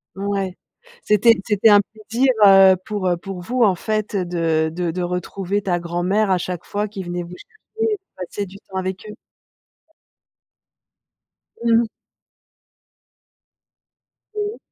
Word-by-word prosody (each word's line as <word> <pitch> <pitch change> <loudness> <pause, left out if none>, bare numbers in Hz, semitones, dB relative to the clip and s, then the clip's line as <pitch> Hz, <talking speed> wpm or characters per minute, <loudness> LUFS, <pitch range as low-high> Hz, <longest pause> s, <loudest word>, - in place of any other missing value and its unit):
Ouais, 195 -2 -2 0.5
c'était 210 +2 +5
c'était 210 +1 +3
un 205 -1 +7
plaisir, 225 +5 -1
heu, 195 -1 +8
pour, 205 -4 -2
heu, 175 - +1
pour 185 +1 -7
vous 245 +7 0
en 195 -4 +4
fait 215 +2 -2
de 165 -3 0
de 175 -1 -2
de 180 +2 -4
retrouver 180 +3 -2
ta 185 -3 0
grand-mère 175 +4 0
à 185 - +3
chaque 180 -1 -5
fois 210 +1 -3
qu'il 195 -2 -7
venait 175 0 -4
vous 175 +1 -10
chercher 440 - -4
et 415 - -4 0.2
passer 185 +2 -5
du 190 - -14
temps 190 - -5
avec 190 +2 -4
eux. 210 - -9 2.5
Mmh 230 -1 +4
mh. - - -2 2.5
Mmh. 420 +1 -3
195 Hz, 140 wpm, -21 LUFS, 180-215 Hz, 2.5 s, heu